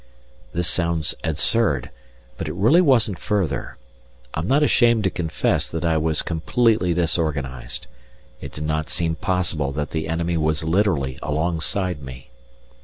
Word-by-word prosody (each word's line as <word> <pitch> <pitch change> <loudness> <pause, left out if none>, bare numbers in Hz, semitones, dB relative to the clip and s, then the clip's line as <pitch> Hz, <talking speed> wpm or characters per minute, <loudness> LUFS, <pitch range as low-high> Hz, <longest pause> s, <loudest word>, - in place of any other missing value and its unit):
This 85 +1 -1
sounds 85 -3 0
absurd, 80 - +1 0.4
but 80 +5 -5
it 75 - -4
really 115 - +5
wasn't 120 - +3
further. 100 -5 -2 0.6
I'm 80 +3 -2
not 145 +5 +3
ashamed 120 -6 +4
to 95 - +1
confess 80 -3 -1
that 80 0 -3
I 80 -1 +2
was 80 0 0
completely 95 +3 +1
disorganized; 75 -7 -2 0.6
it - - -7
did 75 - -6
not 75 0 -1
seem 85 -1 0
possible 85 -7 -1
that 75 0 -3
the 80 0 -2
enemy 85 +1 -1
was 80 0 0
literally 80 -7 +1
alongside 85 +2 -1
me. 65 -1 -10
80 Hz, 140 wpm, -22 LUFS, 75-95 Hz, 0.6 s, really